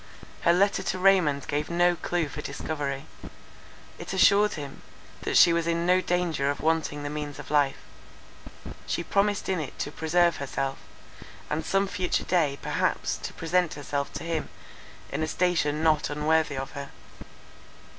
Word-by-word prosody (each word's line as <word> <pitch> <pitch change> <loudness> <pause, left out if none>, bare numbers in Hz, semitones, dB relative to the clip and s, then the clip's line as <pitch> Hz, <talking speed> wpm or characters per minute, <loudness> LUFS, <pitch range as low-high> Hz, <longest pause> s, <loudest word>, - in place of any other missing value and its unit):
Her 170 - +4
letter 195 +3 +3
to 185 - -2
Raymond 185 -7 +3
gave 145 +1 -2
no 175 +1 +3
clue 175 -1 -1
for 145 +1 -7
discovery; 140 -1 -4 0.9
it - - -6
assured 200 +2 +5
him, 145 -3 -7 0.4
that - - +1
she 170 - +7
was 170 0 0
in 170 0 0
no 180 +1 +4
danger 175 -6 0
of 145 - -2
wanting 155 -2 0
the 145 - -3
means 150 -1 -5
of - - -9
life; 145 -2 +3 1.1
she 170 - -1
promised 200 +3 +1
in 190 -3 0
it 150 - -6
to 145 - -3
preserve 170 +2 +2
herself, 135 -1 -3 0.7
and 155 +2 -1
some 195 +4 +1
future 185 -1 -1
day 155 -6 +1
perhaps - - 0
to - - -7
present 175 +1 0
herself 140 -1 -3
to - - -5
him 165 -2 -2 0.6
in - - -2
a 155 - 0
station 160 -4 +1
not 155 -2 +3
unworthy 150 0 +1
of 135 0 -4
her. 140 -1 -7
160 Hz, 160 wpm, -27 LUFS, 145-175 Hz, 1.1 s, she